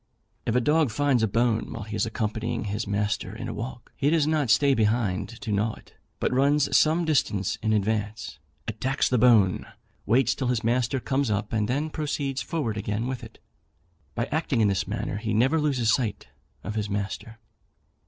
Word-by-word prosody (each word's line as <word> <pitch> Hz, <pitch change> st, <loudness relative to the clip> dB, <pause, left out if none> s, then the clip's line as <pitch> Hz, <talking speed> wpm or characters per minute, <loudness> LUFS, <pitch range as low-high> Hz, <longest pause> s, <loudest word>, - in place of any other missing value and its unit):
If 115 Hz, -, +1 dB
a 125 Hz, -, +4 dB
dog 150 Hz, +2 st, +3 dB
finds 130 Hz, +2 st, +2 dB
a 110 Hz, -, +3 dB
bone 115 Hz, +2 st, +1 dB
while 115 Hz, -, -5 dB
he 110 Hz, +1 st, -6 dB
is 105 Hz, +1 st, 0 dB
accompanying 110 Hz, +1 st, -2 dB
his 105 Hz, +1 st, -3 dB
master 105 Hz, +1 st, -1 dB
in -, -, -5 dB
a -, -, -4 dB
walk, 120 Hz, +2 st, -7 dB
he 140 Hz, -, +1 dB
does 160 Hz, -2 st, +3 dB
not 155 Hz, -4 st, +1 dB
stay 140 Hz, +4 st, +5 dB
behind 105 Hz, -4 st, +1 dB
to 110 Hz, -, -4 dB
gnaw 105 Hz, +2 st, 0 dB
it, -, -, -18 dB, 0.3 s
but -, -, 0 dB
runs 140 Hz, +2 st, +3 dB
some 160 Hz, +3 st, +4 dB
distance 105 Hz, -, +1 dB
in 110 Hz, -, 0 dB
advance, 105 Hz, -3 st, -1 dB, 0.3 s
attacks 130 Hz, +5 st, 0 dB
the 125 Hz, -, +2 dB
bone, 110 Hz, -6 st, +4 dB, 0.4 s
waits 120 Hz, +3 st, +3 dB
till 130 Hz, -, -3 dB
his 120 Hz, -1 st, 0 dB
master 125 Hz, +3 st, +1 dB
comes 135 Hz, 0 st, 0 dB
up, 105 Hz, +1 st, -2 dB
and 105 Hz, -2 st, +1 dB
then 145 Hz, +6 st, -1 dB
proceeds 145 Hz, -3 st, -2 dB
forward 130 Hz, -10 st, -2 dB
again 105 Hz, +2 st, -2 dB
with 130 Hz, -1 st, -4 dB
it. -, -, -11 dB, 0.8 s
By 120 Hz, -, 0 dB
acting 150 Hz, -5 st, 0 dB
in 105 Hz, -2 st, +4 dB
this 95 Hz, -, -1 dB
manner, -, -, -3 dB
he 110 Hz, 0 st, -2 dB
never 135 Hz, +8 st, +3 dB
loses 125 Hz, -7 st, +2 dB
sight 105 Hz, -, -2 dB, 0.3 s
of 105 Hz, -, -4 dB
his 105 Hz, -1 st, -2 dB
master. 105 Hz, +3 st, -4 dB
115 Hz, 190 wpm, -26 LUFS, 105-135 Hz, 0.8 s, stay